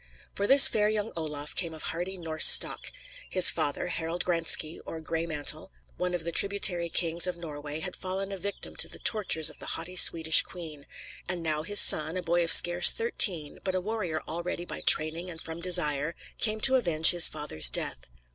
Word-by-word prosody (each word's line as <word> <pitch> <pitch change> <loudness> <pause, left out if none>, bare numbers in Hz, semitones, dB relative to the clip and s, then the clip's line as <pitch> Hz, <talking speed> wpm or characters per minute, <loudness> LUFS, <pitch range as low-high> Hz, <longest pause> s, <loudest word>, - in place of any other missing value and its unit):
For 200 - -4
this 275 +3 +9
fair 210 -1 -2
young 215 0 -5
Olaf 150 -2 -7
came 170 -3 -5
of 155 - -12
hardy 180 +3 -7
Norse 160 -2 +2
stock. - - +4 0.4
His 185 -1 +5
father, 150 -3 -5
Harald 170 0 -6
Graenske, 165 -2 -3
or 165 - -10
"Gray 165 +1 -7
mantle," 155 +2 -2 0.2
one 180 0 -5
of 170 - -6
the 170 - -7
tributary 190 -3 +2
kings 170 +1 -1
of 180 -1 -6
Norway, 150 -2 -10
had 180 0 -6
fallen 190 +1 -6
a 195 - -8
victim 200 +3 -8
to - - +3
the - - -11
tortures 195 -8 +1
of - - -18
the - - -9
haughty 170 +3 -9
Swedish 160 -3 +5
queen; 155 -5 -13 0.4
and 175 -2 -5
now 155 -2 -4
his 205 +6 +1
son, 160 +3 +3
a 180 - -7
boy 175 0 -2
of 165 - 0
scarce 175 0 +6
thirteen, 185 -9 -2
but 190 -1 -5
a - - -2
warrior 185 -5 -6
already 175 +1 -7
by - - -9
training 160 +3 +1
and 165 -2 -11
from 160 +1 -10
desire, 165 -3 -2 0.2
came 215 -1 -1
to 265 - +2
avenge 165 -9 +4
his 175 -1 +5
father's 80 - +1
death. 60 - -4
170 Hz, 195 wpm, -25 LUFS, 160-185 Hz, 0.4 s, this